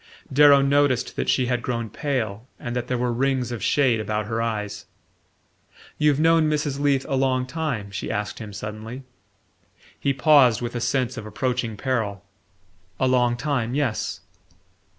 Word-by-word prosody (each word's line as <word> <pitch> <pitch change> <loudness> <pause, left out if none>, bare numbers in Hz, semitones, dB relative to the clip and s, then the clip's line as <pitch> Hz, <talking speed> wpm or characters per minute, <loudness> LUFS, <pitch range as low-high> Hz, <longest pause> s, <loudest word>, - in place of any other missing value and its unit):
Darrow 140 0 +7
noticed 140 -2 +2
that - - -2
she 130 - +2
had 125 -1 -1
grown 115 -2 -2
pale 115 -4 -3
and 120 -3 -5
that 125 -1 -2
there 125 - -1
were 120 0 0
rings 130 -1 0
of 120 - -5
shade 130 -6 +3
about 105 0 -2
her 115 +1 -2
eyes. 105 -3 -3 1.1
"You've 150 -2 +3
known 165 -1 +4
Mrs. 150 -2 -1
Leath 140 -2 +1
a - - -3
long 130 -1 +1
time?" 130 -8 -3
she 95 - -5
asked 105 0 -3
him 110 -3 -7
suddenly. 110 +6 -7 1.0
He 140 - +1
paused 135 -5 +5
with 120 -1 -4
a 120 - -3
sense 130 -1 0
of 105 - -6
approaching 120 0 -2
peril. 105 -7 -2 0.7
"A 130 - +2
long 125 -2 +2
time 125 -3 -1
yes." 140 -7 -1
125 Hz, 160 wpm, -24 LUFS, 115-140 Hz, 1.1 s, Darrow